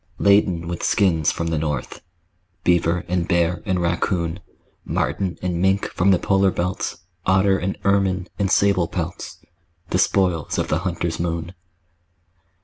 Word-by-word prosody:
Laden 100 -4 +3
with 85 0 -4
skins 85 -7 +2
from 85 0 -3
the 80 -2 0
north, 75 -4 -3 0.6
Beaver 85 0 +2
and 90 -1 -1
bear 85 0 +1
and 95 -2 +1
raccoon, 85 0 -1 0.4
Marten 95 -3 -2
and 90 -2 -1
mink 95 +1 +2
from 90 +3 +2
the 95 - +5
polar 95 +1 +2
belts, 90 0 -3 0.3
Otter 95 +1 +3
and 95 +2 -3
ermine 95 -2 +1
and 100 -1 +1
sable 100 -4 +3
pelts 90 -1 -5 0.5
The 90 - +2
spoils 90 -6 +1
of - - -1
the 75 - +1
hunter's 85 -2 -3
moon. 85 0 -3
90 Hz, 145 wpm, -22 LUFS, 85-95 Hz, 0.6 s, the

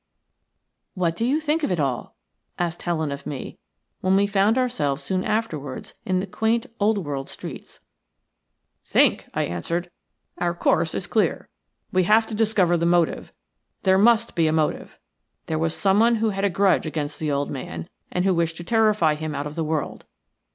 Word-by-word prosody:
"What 170 -3 0
do 225 - -2
you 270 +6 +2
think 310 +1 0
of 290 - 0
it 175 - 0
all?" 135 -4 -2 0.4
asked 175 -1 -2
Helen 160 -4 -1
of 140 0 -6
me, 135 -3 -6 0.4
when 185 +1 +2
we 200 +1 +4
found 200 +3 +2
ourselves 150 - 0
soon 185 -1 -1
afterwards 155 - -3
in 185 -1 +2
the 190 - -2
quaint, 220 +4 0
old 210 +1 +3
world 140 -2 -4
streets. - - -9 1.0
"Think!" - - +2
I - - +1
answered. 170 - -3 0.5
"Our 175 -1 0
course - - +1
is - - -2
clear. - - 0 0.4
We 185 -1 +2
have 215 +4 +5
got - - -14
to - - -5
discover 205 -5 +2
the 170 0 +1
motive. 170 -1 +1 0.5
There 190 -1 +4
must 230 +2 +4
be 165 -2 +2
a - - +2
motive. 155 -1 -1 0.5
There 155 -1 -2
was 165 0 0
someone 215 +4 +4
who 220 -1 +1
had 195 0 -1
a - - +3
grudge 185 -2 +2
against 150 -1 -4
the 155 -2 -1
old 140 0 -1
man, 85 - -6 0.2
and 180 +1 0
who 190 - +4
wished 165 -1 0
to 175 - -6
terrify 215 -6 +3
him 155 0 -4
out 140 +1 -3
of 150 - -5
the 165 +1 -2
world. 155 -1 -3
175 Hz, 185 wpm, -24 LUFS, 155-210 Hz, 1.0 s, have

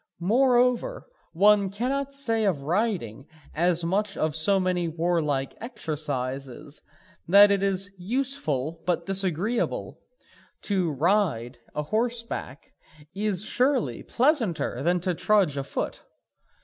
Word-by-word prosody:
Moreover, 250 - +2 0.3
one 200 +2 +4
cannot 265 +7 -2
say 230 -5 +1
of 165 -9 0
riding 165 - -2 0.3
as 170 +1 +2
of 190 -4 -1
so 195 +5 +3
many 180 -2 0
warlike 160 -5 -1
exercises 145 - -4 0.5
that 200 +3 +7
it 200 -1 +2
is 195 0 0
useful 175 - -1
but 170 -1 0
disagreeable. 195 +4 -1 0.6
To 185 -5 0
ride 150 - 0 0.2
a 150 - -1
horseback 230 - -3 0.4
is 205 -1 -1
surely 250 - 0
pleasanter 230 - 0
than 175 +4 +2
to 180 0 0
trudge 190 -4 +2
a 140 - -2
foot? - - -4
185 Hz, 110 wpm, -26 LUFS, 155-220 Hz, 0.6 s, that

